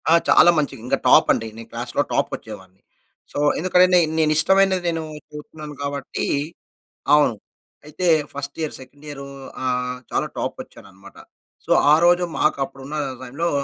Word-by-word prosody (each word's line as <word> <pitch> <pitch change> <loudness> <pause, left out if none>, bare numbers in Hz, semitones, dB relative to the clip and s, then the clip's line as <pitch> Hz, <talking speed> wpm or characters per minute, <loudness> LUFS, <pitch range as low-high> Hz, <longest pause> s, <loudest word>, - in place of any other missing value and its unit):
ఆ! - - +5 0.2
చాలా 175 - +7
మంచిగ, 145 -3 -1
ఇంగా - - 0
టాప్ - - +6
అండి. 115 - -3
నేను 115 - -10
క్లాస్‌లో - - -2
టాపోచ్చేవాడిని. 95 0 -5 0.5
సో - - -4 0.2
ఎందుకంటే 180 +1 +4
నే 180 - +7 0.2
నేను 155 -1 +2
ఇష్టమైనది 190 +2 +5
నేను 165 -1 -3 0.3
కోరుకున్నాను 150 0 -10
కాబట్టి 140 -1 -4 0.9
అవును. 145 -6 +3 0.5
అయితే 155 +5 -4 0.3
ఫస్ట్ 140 0 -6
ఇయర్, 155 - -3
సెకండ్ 140 +3 -15
ఇయరూ 140 -1 -8 0.4
ఆహ్, 125 0 -2
చాలా - - 0
టాపో‌చ్చాననమాట. 100 0 -8 0.5
సో - - -5 0.2
ఆ - - +8
రోజు 175 +1 +4 0.2
మాకు 155 - +1
అప్పుడు 135 0 -14
ఉన్న 150 - -6 0.3
టైమ్‌లో, 140 +7 -3
145 Hz, 145 wpm, -21 LUFS, 130-160 Hz, 0.9 s, ఆ